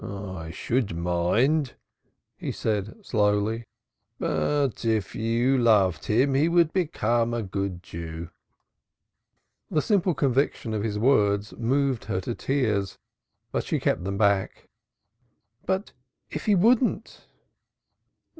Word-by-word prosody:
"I 95 -4 -6
should 105 +3 -1
mind," 110 - +1 0.6
he - - -4
said 110 - -3
slowly. 105 +1 +1 0.5
"But 140 -7 0
if 110 -4 0
you 120 +4 +1
loved 100 -8 +3
him 130 +6 +2
he 145 +5 +3
would 170 -2 +3
become 120 - 0
a 115 - -2
good 95 -2 -4
Jew." 85 0 -7 1.4
The 150 - +1
simple 190 -5 +2
conviction 135 -4 0
of 105 - -1
his 105 -1 -2
words 105 -4 +2
moved 130 +1 0
her 100 -3 -1
to 120 - -3
tears, 110 -8 -1 0.5
but - - -1
she - - -1
kept - - 0
them 100 +1 -3
back. 100 -2 +1 1.0
"But 190 +2 -1 0.4
if - - -5
he 210 - +5
wouldn't?" 235 +6 +1
115 Hz, 115 wpm, -26 LUFS, 100-140 Hz, 1.4 s, he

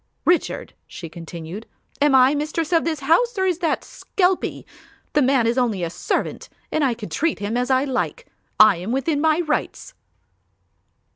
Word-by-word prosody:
"Richard," 350 -1 0
she 165 - -9
continued, 170 +4 -8 0.3
"am 290 -2 +4
I 260 +2 +6
mistress 310 +3 -2
of 330 - +3
this 315 -3 -2
house 375 - +2
or 380 - +1
is 360 -3 0
that 330 -4 0
skelpie? 370 -1 -1 0.5
The 295 - +3
man 260 -3 +3
is 235 +3 +1
only 220 -7 0
a 165 - -2
servant - - -3 0.2
and 310 - +1
I 255 -4 +1
can 215 -5 -8
treat 315 - 0
him 205 +3 -3
as 250 +1 0
I 260 0 +3
like. 285 - -2 0.3
I 215 -4 +7
am 185 +6 -5
within 280 +3 0
my 315 +1 +3
rights." 320 +9 -3
275 Hz, 170 wpm, -22 LUFS, 225-325 Hz, 0.5 s, I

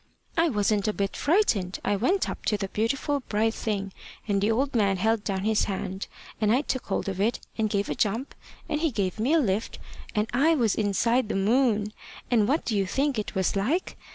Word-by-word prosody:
I 330 0 +3
wasn't 210 -3 +1
a 215 - +1
bit 200 -1 -2
frightened. 235 - +1
I 205 - +2
went 350 - +1
up - - -6
to 210 - +2
the 195 -1 -4
beautiful 275 +7 0
bright 220 -3 0
thing, 200 -5 -3 0.3
and 200 -2 +1
the 205 - +2
old 265 +5 +1
man 200 -5 +2
held 220 +2 +1
down 190 -2 -2
his 215 0 +2
hand, 190 -1 -4 0.3
and 210 -1 +3
I 250 +4 +4
took 260 -3 -3
hold 200 - -1
of 195 -1 -2
it, 225 +4 +1 0.2
and 220 -1 0
gave 200 0 0
a - - -1
jump, 225 +6 -1 0.3
and 300 - -1
he 330 - +2
gave 200 -5 -2
me 250 +8 +2
a 330 - +5
lift, 215 -5 -1 0.4
and 210 +1 +1
I 310 +7 +4
was 230 -8 +2
inside 220 +3 +1
the - - -1
moon. 215 0 +2 0.4
And 220 -4 +4
what 290 +6 +1
do 225 - -1
you 195 -2 +1
think 270 +3 0
it 210 - -5
was 190 0 +1
like? 260 - 0
215 Hz, 215 wpm, -26 LUFS, 200-255 Hz, 0.4 s, a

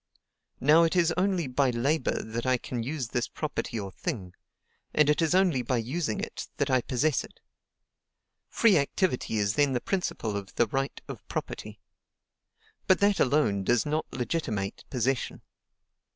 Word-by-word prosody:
Now 150 +5 +6
it 165 +1 +2
is 170 -2 +3
only 185 -2 +1
by 130 +1 +1
labor 130 +4 0
that 115 +1 -4
I 130 -1 +2
can 120 0 -4
use 130 0 -3
this 120 -1 -1
property 145 -6 -4
or 100 -2 -5
thing, 95 -2 -5 0.6
and 150 -1 +5
it 150 - +1
is 165 +2 +2
only 185 -9 +3
by 125 +1 0
using 120 +1 -2
it - - -5
that 140 -1 0
I 130 -1 +4
possess 140 +4 +1
it. - - -14 1.1
Free 215 -8 +4
activity 140 -4 0
is 100 -1 +1
then 145 +1 +2
the 125 - +1
principle 120 - -2
of 100 -1 -6
the 120 - +4
right 135 +5 -2
of - - -9
property. - - -5 1.1
But 190 - +6
that 200 -1 +3
alone 125 -8 +2
does 120 +3 +2
not 155 +1 -2
legitimate 110 -8 -2
possession. 130 +1 -1
130 Hz, 160 wpm, -28 LUFS, 115-160 Hz, 1.1 s, Now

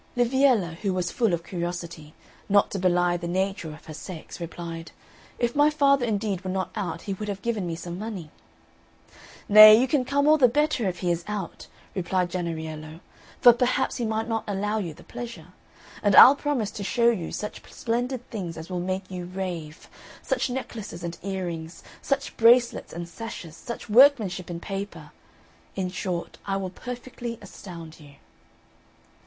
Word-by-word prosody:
Liviella, 245 -8 +3
who 195 -1 -1
was 180 -1 -1
full 230 -5 +1
of 170 -1 -1
curiosity, 170 -3 -5 0.3
not 205 0 +4
to 195 - -3
belie 175 -1 +2
the 170 0 -5
nature 190 -2 -2
of 155 - -13
her 155 - -8
sex, 170 +1 -9
replied, 165 0 -7 0.5
"If 240 +1 -1
my 290 +1 +5
father 280 -4 +3
indeed 200 -3 -1
were 190 - -4
not 185 0 -2
out 205 -4 -4
he 200 - -3
would 210 +2 -6
have 200 -1 -5
given 220 -6 -1
me 165 - -3
some 175 +1 -7
money." 200 -8 -6 1.2
"Nay, 215 +1 +10
you 260 - +2
can 265 0 +2
come 280 +3 +1
all 310 0 +6
the 255 - +7
better 290 -3 +1
if 180 -2 -4
he 180 -2 +1
is 170 0 -2
out," 210 -2 -5 0.3
replied 180 -1 -1
Jennariello, 160 -3 -5 0.4
"for 240 - +9
perhaps 250 +2 0
he 245 - -2
might 220 0 -1
not 225 -1 -1
allow 210 +2 -1
you 170 -7 -5
the - - -15
pleasure; 235 -9 -8 0.5
and 205 -2 +3
I'll 270 - +11
promise 280 -8 -1
to 205 - -6
show 235 +4 +3
you 180 -8 -4
such 210 - -5
splendid 245 +2 -2
things 180 -8 -5
as 160 +3 -8
will 180 - -2
make 185 +1 -3
you 180 -1 -5
rave 175 -4 -6 0.4
such 265 -1 0
necklaces 220 -8 -6
and 170 0 -4
earrings, 175 -4 -5 0.2
such 275 0 -2
bracelets 235 +1 +4
and 170 0 -6
sashes, 175 -4 -8
such 235 +7 -7
workmanship 215 -7 +5
in 170 -1 -4
paper 195 +2 -6 0.6
in 185 -2 -2
short 180 -2 -4
I 195 -1 -1
will 190 -2 -4
perfectly 245 +1 -7
astound 170 -5 -10
you." 145 -2 -15
195 Hz, 170 wpm, -26 LUFS, 175-235 Hz, 1.2 s, I'll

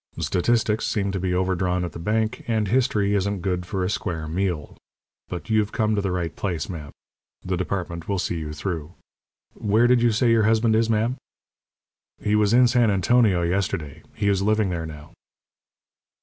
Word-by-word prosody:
Statistics 110 +3 +1
seem 100 -2 -1
to 95 - -2
be 90 0 -1
overdrawn 90 0 0
at 85 - -5
the - - -9
bank, 110 +6 -1
and 110 -3 0
History 110 -5 +2
isn't 100 -1 0
good 90 -2 -2
for 95 -1 -2
a 90 - 0
square 80 -6 -3
meal. 85 -3 -2 0.5
But 90 +5 -6
you've 110 -1 +2
come 110 -1 +1
to 105 - +1
the 95 - -1
right 85 -3 -2
place, 90 -5 -3
ma'am. 80 -5 -7 0.6
The 90 - -1
department 85 -2 -4
will 100 - 0
see 85 -2 -2
you 75 -1 -5
through. 80 0 -5 0.6
Where 110 +3 +2
did 120 0 +4
you 120 -1 +4
say 115 +2 +2
your 115 -1 +4
husband 110 0 +3
is, 115 0 +2
ma'am?" 115 +4 +1 1.0
"He 105 - -1
was 105 -1 +3
in 125 +1 +6
San 120 -2 +3
Antonio 100 -1 +3
yesterday. 85 -4 -2
He 100 - -1
is 100 -1 +2
living 105 0 +2
there 85 -2 -3
now." 75 -1 -11
100 Hz, 180 wpm, -24 LUFS, 90-110 Hz, 1.0 s, in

